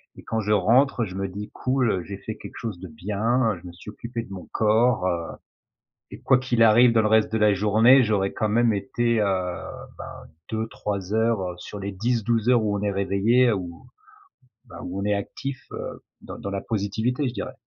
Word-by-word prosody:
et - - -13
quand 110 - -2
je 105 0 -2
rentre, 115 +5 +3
je 90 -2 -8
me 95 0 -2
dis: 100 +3 -7
«Cool, 130 -3 +1
heu, 90 - -2
j'ai 100 +2 -7
fait 110 +2 -7
quelque - - -10
chose 110 -7 -5
de 95 - -8
bien, 105 +7 0
je 90 - -11
me - - -8
suis 85 +4 -12
occupé 115 +1 -6
de 100 - -11
mon 95 - -8
corps», 110 -2 +2
heu, 85 -2 -1 0.9
et - - -10
quoi 135 - +4
qu'il 125 -3 +1
arrive 115 +2 +6
dans 115 -1 +3
le 105 - +2
reste 110 0 +3
de - - +1
la 105 -1 +4
journée, 110 +6 +5
j'aurais 100 -3 0
quand 110 - -1
même 115 +2 +3
été, 115 +3 0
heu, - - +2 0.7
ben - - -9 0.2
2-3 105 -3 -4
heures, 110 -1 +2
heu, 90 -1 -4
sur 105 - -8
les 100 +1 -4
10-12 115 +2 0
heures 120 -2 +5
où 105 -1 0
on - - -5
est 100 -1 0
réveillé 100 +6 +2
ou 90 -4 -5 0.8
bah 115 - -12
où 95 +2 -4
on - - -3
est 105 - +2
actif, 130 +6 -5
heu, - - -6 0.2
dans - - -9
dans 100 - -5
la 100 0 -3
positivité, 110 +6 -1
je 120 - -4
dirais. - - -5
110 Hz, 215 wpm, -24 LUFS, 100-115 Hz, 0.9 s, arrive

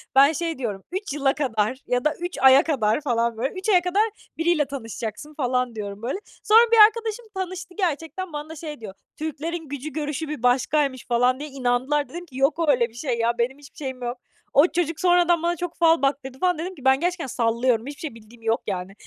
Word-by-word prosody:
Ben 280 +3 +7
şey 330 0 -3
diyorum, 210 -7 -4
"3 380 -4 -4
yıla 275 -2 +2
kadar 245 -4 -1
ya 250 +1 0
da 305 - +3
3 350 +1 -4
aya 265 +2 +8
kadar." 245 -5 +1
falan, 235 -4 0
böyle. 260 +4 -2
"3 375 +3 -4
aya 365 -4 +5
kadar 370 +4 +2 0.3
biriyle 325 -3 +2
tanışacaksın." 245 +1 -6
falan 250 -4 -1
diyorum, 205 -1 -6
böyle. 260 +11 -3 0.2
Sonra 455 +2 +6
bir 460 - +5
arkadaşım 455 +1 -2
tanıştı 370 -1 -5
gerçekten. 345 0 -2
Bana 300 +2 -6
şey 300 -3 -7
diyor: 200 -3 -7 0.2
"Türklerin 315 +1 -4
gücü 285 +2 -5
görüşü 300 +1 -3
bir 295 -5 -6
başkaymış." 260 +1 +1
falan 245 +2 +2
diye 300 +1 -6
inandılar. 265 +2 0
Dedim 345 +4 -7
ki, 265 -6 -12
"Yok 280 +4 +2
öyle 245 -4 +3
bir 225 - -22
şey 240 -1 -2
ya, 235 +1 +1
benim 250 +4 0
hiçbir 285 -1 -16
şeyim 260 -3 -5
yok." 245 +1 -3 0.4
O 290 +5 +6
çocuk 335 -3 -2
sonradan 350 -2 +3
bana 345 0 +1
çok 350 0 -4
fal 330 -2 +4
baktırdı, 270 -1 -1
falan. 360 -1 +2
Dedim 360 +4 -5
ki, 270 -5 -14
"Ben 265 0 +5
gerçekten 350 -2 -1
sallıyorum, 235 -1 +1
hiçbir 285 - -8
şey 295 -8 -6
bildiğim 230 +1 -16
yok, 225 +1 +1
yani." 190 -1 -4
285 Hz, 210 wpm, -24 LUFS, 245-335 Hz, 0.4 s, aya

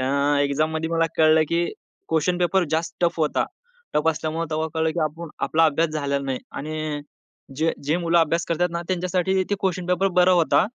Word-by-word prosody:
अ, 130 - 0 0.3
exam 145 +3 +1
मध्ये 160 +1 -2
मला 165 0 +2
कळलं, 155 0 +5
की 170 +1 +1 0.4
क्वेशन 165 +3 +1
पेपर 180 +1 +2
जास्त 160 +1 -1
टफ 170 -1 +1
होता. 150 - +1 0.5
टफ 150 +2 +2
असल्यामुळे 160 +1 -1
तेव्हा 155 +1 -1
कळलं 160 0 +1
की 170 - +1
आपण 160 +2 -3 0.2
आपला 165 +1 +3
अभ्यास 160 +1 +2
झालेला 140 -2 -1
नाही 135 -2 -2
आणि 155 0 -4 0.6
जे 160 +3 +1
जे 150 +3 +1
मुलं 170 -1 +2
अभ्यास 165 +1 +2
करतात 175 +2 +1
ना 170 - -2
त्यांच्यासाठी 185 +1 0
ते - - +3
क्वेशन 185 -2 -1
पेपर 180 +2 +2
बरा 180 +1 +6
होता 170 +3 +3
165 Hz, 190 wpm, -23 LUFS, 155-175 Hz, 0.6 s, बरा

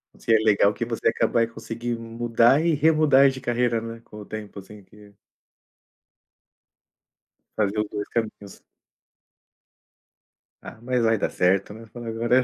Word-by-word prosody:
Isso - - -3
é 115 - +7
legal, 105 -1 +3
que 120 - -4
você 115 -1 -2
acaba 115 - 0
aí 115 - +2
conseguindo 115 0 -6
mudar 120 +5 +2
e 170 - +3
remudar 150 -2 +4
de 130 0 -6
carreira, 120 -2 0
né, 115 0 -8
com 105 - -14
o 105 - -9
tempo, 105 -1 -8
assim, 100 +1 -14
que 105 +1 -18 2.4
Fazer 105 0 0
os 105 - -1
dois 105 -1 -5
caminhos. 105 -3 -5 2.0
Ah, - - -11
mas 125 0 -1
vai 115 0 +3
dar - - -1
certo, 95 +3 +1
né, 115 +1 -12
falar 120 0 -8
agora 120 +3 +1
115 Hz, 150 wpm, -24 LUFS, 105-120 Hz, 2.4 s, é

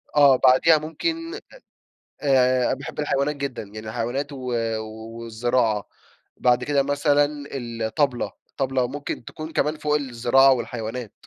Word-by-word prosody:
آه، 140 -2 +7
بعديها 130 +5 +5
ممكن 330 - -3
أ - - -6 0.8
آآ، 130 -3 +3
باحب 140 +2 -6
الحيوانات 145 0 0
جدًا، 140 -3 -4
يعني 110 +1 -9
الحيوانات 120 +6 -3
و 140 - -7 0.8
والزراعة، 115 -2 0 0.5
بعد 125 0 +2
كده 145 -1 +2
مثلًا 145 +1 +2 0.2
الطبلة، 120 +1 -1 0.2
الطبلة 130 -2 -1
ممكن 145 -2 -5
تكون 155 +5 -8
كمان 155 0 0
فوق 150 0 +1
الزراعة 135 0 +4
والحيوانات. 120 -2 -4
135 Hz, 125 wpm, -23 LUFS, 120-145 Hz, 0.8 s, آه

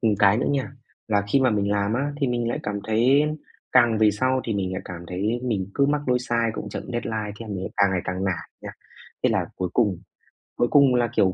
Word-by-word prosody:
ừm, 110 -2 +2
cái 100 0 +5
nữa - - 0
nha, 135 -2 -1 0.4
là 100 -2 +2
khi 135 - +5
mà 130 - +3
mình 100 -2 0
làm 100 +1 0
á 140 +4 -1
thì 140 -2 0
mình 120 -1 -1
lại - - -2
cảm 100 0 -3
thấy 120 +7 +3 0.5
càng 120 -3 +5
về 110 -1 +5
sau 130 +5 0
thì 115 - -2
mình 95 -2 -2
lại 95 - -4
cảm 90 -2 -7
thấy 105 +7 -1
mình 105 -7 -1
cứ 140 -1 +3
mắc 145 -2 -1
lỗi 125 0 +3
sai, 120 -2 0
cũng - - -5
chậm - - -5
deadline, 110 -3 -3
thế 115 - -6
là 100 - -4
mình 95 0 -4
càng 100 -1 +4
ngày 90 - 0
càng 95 +1 -3
nản 90 -4 -2
nha. - - -6 0.5
Thế - - +4
là - - 0
cuối 90 -1 -2
cùng 105 -7 +2 0.6
cuối 120 - +2
cùng 140 -3 +5
là, 120 -1 +2
kiểu, 95 -2 +3
110 Hz, 250 wpm, -24 LUFS, 100-125 Hz, 0.6 s, cái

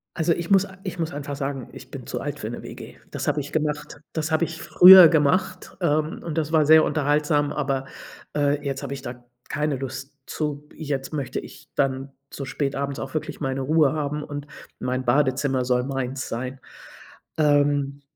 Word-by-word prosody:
Also, 165 0 +2
ich 170 +2 -5
muss 195 0 +5
a 190 -1 -13
ich 180 -2 -5
muss 160 -2 -2
einfach 145 0 -5
sagen, 135 -2 -4
ich - - -12
bin - - -8
zu - - -3
alt - - -5
für - - -4
'ne - - -7
WG. - - -10 0.2
Das - - -4
habe 150 - +1
ich 145 - -9
gemacht 150 -1 -2
das 160 -1 -2
habe 160 +2 +2
ich 160 0 -8
früher 180 +1 +10
gemacht, 185 +5 +1
ähm, 155 -1 0
und 165 -1 -5
das 155 0 -1
war 155 -2 +4
sehr 160 +1 +7
unterhaltsam, 150 0 +1
aber, 135 -2 -1 0.5
äh, 145 0 +1
jetzt 135 0 -2
habe 140 0 -4
ich 135 - -7
da 120 0 -8 0.3
keine 150 -2 -1
Lust 135 +1 -6
zu, 150 -1 -4
jetzt 145 -2 -4
möchte 140 -4 -3
ich - - -13
dann 135 0 0 0.2
so 140 - -6
spät 140 0 -2
abends 140 0 -3
auch 135 +1 -6
wirklich 155 -1 -4
meine 135 0 -1
Ruhe 150 +1 +3
haben 150 0 -2
und 145 0 -6 0.3
mein 130 +1 -2
Badezimmer 130 0 +2
soll 125 0 +2
meins 135 -1 -3
sein, 130 +3 -4 0.8
ähm 145 -2 +2
145 Hz, 190 wpm, -24 LUFS, 135-155 Hz, 0.8 s, früher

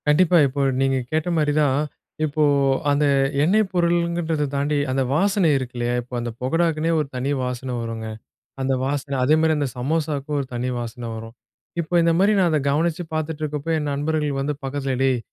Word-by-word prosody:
கண்டிப்பா. 170 +4 +5
இப்ப 140 +2 -5 0.2
நீங்க 135 0 +2
கேட்ட 155 +2 0
மாரி 150 -1 +2
தான், 140 -1 +2 0.5
இப்ப 155 +1 -5 0.5
அந்த 145 +1 +2 0.4
எண்ணெய் 210 +7 +3
பொருள்கறத 170 -3 +1
தாண்டி 145 +2 0
அந்த 135 +1 +1
வாசனை 195 +2 +3
இருக்கு 130 -1 -5
இல்லயா? 120 0 0
இப்ப 125 +1 -15
அந்த 120 0 -3
பகடாவுக்குன்னே 165 +3 +1
ஒரு 150 - -1
தனி 130 +3 -1
வாசன 125 0 -3
வருங்க. 115 -1 -5 0.5
அந்த 135 0 +1
வாசனை. 140 0 -2
அதே 150 +4 +4
மாரி 160 0 +3
அந்த 145 -1 0
சமோசாவுக்கும் 150 +1 -1
ஒரு 135 - -3
தனி 125 +1 -1
வாசனை 120 0 -6
வரும். 115 +1 -9 0.5
இப்ப 165 +2 -8
இந்த 165 - +4
மாரி 200 +3 +4
நான் 180 -2 +3
அத 155 - +3
கவனிச்சு 165 +3 0
பார்த்துட்டு 155 0 -3
இருக்கப்ப, 150 0 -4
என் 150 -1 -2
நண்பர்கள் 145 0 -1
வந்து 145 +2 -1
பக்கத்தில 135 -1 -2
"டேய் 130 -2 +2
145 Hz, 175 wpm, -22 LUFS, 130-160 Hz, 0.5 s, கண்டிப்பா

